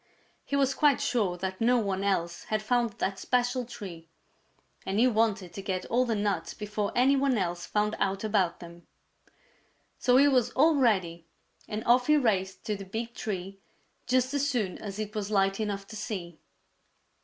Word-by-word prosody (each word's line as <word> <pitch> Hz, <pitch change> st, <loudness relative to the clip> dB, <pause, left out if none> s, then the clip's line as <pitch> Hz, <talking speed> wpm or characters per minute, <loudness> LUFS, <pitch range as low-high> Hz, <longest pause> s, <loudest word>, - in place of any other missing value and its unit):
He 280 Hz, -, -3 dB
was 270 Hz, -1 st, +2 dB
quite 290 Hz, -2 st, +3 dB
sure 200 Hz, -8 st, 0 dB
that 190 Hz, +2 st, -4 dB
no 245 Hz, +2 st, +4 dB
one 200 Hz, -4 st, -1 dB
else 170 Hz, -4 st, -1 dB
had 215 Hz, 0 st, -1 dB
found 235 Hz, -1 st, +1 dB
that 195 Hz, -1 st, -3 dB
special 245 Hz, 0 st, 0 dB
tree, 170 Hz, -8 st, -9 dB, 0.7 s
and 195 Hz, -, -2 dB
he 235 Hz, -, +5 dB
wanted 215 Hz, -7 st, +1 dB
to 195 Hz, -, -6 dB
get 185 Hz, -1 st, -3 dB
all 250 Hz, +2 st, +3 dB
the 230 Hz, -2 st, 0 dB
nuts 205 Hz, -5 st, -2 dB
before 210 Hz, -1 st, -3 dB
any 260 Hz, +3 st, +4 dB
one 270 Hz, -2 st, +2 dB
else 175 Hz, -3 st, -2 dB
found 210 Hz, +1 st, 0 dB
out 195 Hz, +1 st, -1 dB
about 200 Hz, -5 st, +1 dB
them. 170 Hz, 0 st, -12 dB, 1.1 s
So 250 Hz, 0 st, +4 dB
he 280 Hz, +2 st, +6 dB
was 255 Hz, -4 st, +3 dB
all 315 Hz, +5 st, +5 dB
ready 185 Hz, -, +1 dB, 0.4 s
and 215 Hz, +1 st, -4 dB
off 245 Hz, +1 st, +4 dB
he 300 Hz, 0 st, +5 dB
raced 195 Hz, -8 st, 0 dB
to 215 Hz, -2 st, -1 dB
the 200 Hz, -, -7 dB
big 225 Hz, +5 st, -5 dB
tree 195 Hz, -3 st, -5 dB, 0.5 s
just 255 Hz, +1 st, +2 dB
as 285 Hz, 0 st, +1 dB
soon 215 Hz, -9 st, -1 dB
as 200 Hz, -2 st, -6 dB
it 215 Hz, -1 st, -4 dB
was 210 Hz, -2 st, -3 dB
light 195 Hz, -1 st, +2 dB
enough 200 Hz, -2 st, -3 dB
to 215 Hz, -, -10 dB
see. 185 Hz, -7 st, -5 dB
210 Hz, 180 wpm, -28 LUFS, 190-245 Hz, 1.1 s, he